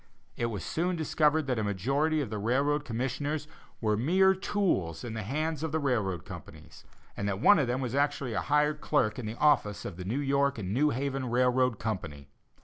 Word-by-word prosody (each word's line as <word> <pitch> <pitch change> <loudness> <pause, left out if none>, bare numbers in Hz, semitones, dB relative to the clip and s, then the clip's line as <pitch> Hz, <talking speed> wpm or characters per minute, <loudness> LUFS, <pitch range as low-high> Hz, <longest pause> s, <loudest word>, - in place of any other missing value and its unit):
It 120 - -1
was 105 -7 -4
soon 175 - -1
discovered 155 -1 +2
that 125 -4 -1
a - - 0
majority 135 - 0
of 125 -7 -4
the 105 - -3
railroad 140 +7 +1
commissioners 140 +5 -2 0.3
were 105 -2 +1
mere 185 - +4
tools 185 - -1
in 120 -2 -5
the 110 - -3
hands 150 +7 -2
of 160 -1 -2
the 160 - +1
railroad 110 - -1
companies, 90 -6 -11 0.3
and 100 - -3
that 95 -1 -2
one 205 - +6
of 135 - +1
them 125 +2 -1
was 125 -2 -3
actually 140 -3 0
a - - 0
hired 150 +1 +1
clerk 110 -7 +1
in 115 - -5
the 110 - -5
office 105 -9 +2
of 85 - -6
the 90 - -6
New 105 +8 -2
York 140 -1 +1
and 100 -2 -3
New 150 +6 +3
Haven 135 -1 -2
Railroad 125 -1 +2
Company. 80 - -5
130 Hz, 205 wpm, -29 LUFS, 110-150 Hz, 0.3 s, one